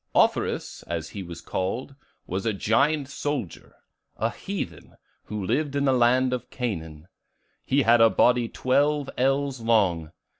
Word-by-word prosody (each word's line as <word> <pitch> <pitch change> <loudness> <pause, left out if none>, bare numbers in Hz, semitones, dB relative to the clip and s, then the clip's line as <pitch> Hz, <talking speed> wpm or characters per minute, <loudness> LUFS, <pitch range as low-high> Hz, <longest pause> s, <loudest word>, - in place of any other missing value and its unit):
"Offerus, - - +1
as 85 -1 -3
he 100 - -7
was 85 -2 -8
called, 115 +9 -3 0.3
was 95 +2 -3
a 110 - +1
giant 140 +8 +2
soldier; 140 - -4 0.4
a - - 0
heathen, - - -6 0.3
who 105 -2 -4
lived 145 +7 0
in 140 0 +1
the 135 - +4
land 125 +1 +3
of 125 - -4
Canaan. 80 - -5 0.6
He 140 +1 +2
had 115 0 +5
a 115 - +8
body 120 0 +3
twelve 145 +2 +1
ells 135 0 +1
long. 95 -9 +2
120 Hz, 145 wpm, -25 LUFS, 95-135 Hz, 0.6 s, a